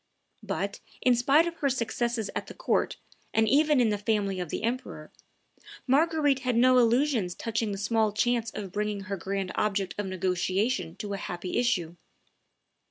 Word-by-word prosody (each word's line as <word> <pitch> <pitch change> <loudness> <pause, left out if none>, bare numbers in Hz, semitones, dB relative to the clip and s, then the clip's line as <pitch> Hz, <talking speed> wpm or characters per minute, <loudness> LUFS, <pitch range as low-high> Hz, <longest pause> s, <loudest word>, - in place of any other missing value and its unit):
But, - - -3 0.2
in 250 -1 +5
spite 275 +7 +4
of 340 -1 -4
her 280 - +1
successes 235 -3 -1
at - - -3
the - - -10
court, - - 0 0.4
and 220 0 +4
even 295 +2 +4
in 235 -3 +4
the 205 -1 -1
family 205 -3 0
of 175 -3 -4
the - - -4
emperor, 245 +3 -4 0.7
Marguerite 290 0 +3
had 250 -2 -1
no 255 +2 +5
illusions 235 -5 +2
touching 225 -2 -2
the 200 - -3
small 215 +1 +1
chance 230 +2 +1
of 200 -4 -7
bringing 210 0 -2
her 200 0 -4
grand 190 +1 -3
object 195 -4 -1
of 205 - -2
negotiation 185 +1 -1
to 200 0 -5
a - - -2
happy 180 0 -5
issue. 175 -9 0
220 Hz, 165 wpm, -28 LUFS, 195-250 Hz, 0.7 s, in